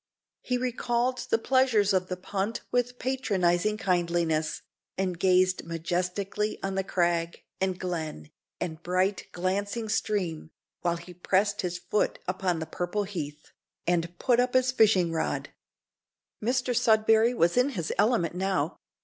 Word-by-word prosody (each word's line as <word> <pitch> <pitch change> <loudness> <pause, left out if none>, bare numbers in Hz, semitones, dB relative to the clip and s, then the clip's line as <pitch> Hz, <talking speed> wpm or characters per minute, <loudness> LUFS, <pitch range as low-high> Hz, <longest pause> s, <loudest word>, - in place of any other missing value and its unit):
He 250 - -1
recalled 250 0 0
the - - +4
pleasures 230 -5 +3
of 185 -1 +1
the 180 - -4
punt 200 +4 -3
with 245 0 0
patronising 210 -7 +1
kindliness, 170 -4 0 0.3
and 185 -2 -1
gazed 185 0 +3
majestically 180 +5 -2
on 195 0 0
crag, 170 -2 0 0.2
and 190 -1 -1
glen, 160 - -4 0.3
and 160 -2 -4
bright, 185 +3 0
glancing 200 +5 -2
stream, 185 -8 -1 0.3
while 170 -1 0
he 170 +2 -11
pressed 195 +3 +1
his 180 -1 -2
foot 210 +4 0
upon 185 -1 0
the 160 - -3
purple 175 +6 -2
heath, 160 -7 -6 0.3
and 175 0 0
put 245 +3 +2
up 250 0 +1
his 255 0 +4
fishing 205 -8 +4
rod! 160 - -2 0.9
Mr 250 +1 +1
Sudberry 225 0 +4
was 170 -5 +3
in 250 +3 +4
his 180 - -3
element 210 -8 +3
now. 185 -3 -1
190 Hz, 135 wpm, -28 LUFS, 175-220 Hz, 0.9 s, the